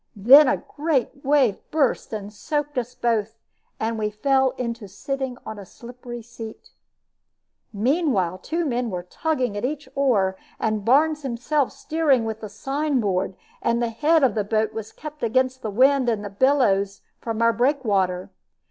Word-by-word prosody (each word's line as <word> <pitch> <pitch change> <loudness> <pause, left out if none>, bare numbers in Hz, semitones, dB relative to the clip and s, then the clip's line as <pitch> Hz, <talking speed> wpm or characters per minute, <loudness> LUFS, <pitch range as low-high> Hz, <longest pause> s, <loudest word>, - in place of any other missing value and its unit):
Then 260 +9 +8
a 285 - +2
great 285 -3 -2
wave 270 -7 +3
burst 295 -5 0
and 210 -1 -6
soaked 295 +6 -3
us 245 +1 -6
both, 225 -2 0 0.4
and 225 0 -1
we 210 -1 0
fell 265 +5 +2
into 235 -3 -4
sitting 265 +5 -4
on 220 -1 -6
a - - -8
slippery 240 +3 -10
seat. 225 -1 -10 1.0
Meanwhile 215 - +1
two 335 +1 -2
men 245 -3 -1
were 180 -3 -4
tugging 255 - -2
at 205 - -4
each 290 +2 -3
oar, 210 -9 +2 0.2
and 215 -2 -1
Barnes 300 +6 +3
himself 270 +2 -1
steering 295 -7 +1
with 220 0 -4
the 215 - -6
sign 275 +6 -1
board; 190 -3 -1 0.3
and 235 0 +1
the 235 -1 0
head 300 +7 +2
of 255 -5 +4
the 210 - 0
boat 220 +1 0
was 220 -1 -6
kept 305 -1 -10
against 255 +2 +1
the 220 - -3
wind 260 +4 +4
and 210 -3 -1
the 200 - -6
billows 200 -5 +2 0.2
from 225 -1 -4
our 230 0 +4
breakwater. 205 -9 0
240 Hz, 165 wpm, -23 LUFS, 215-275 Hz, 1.0 s, Then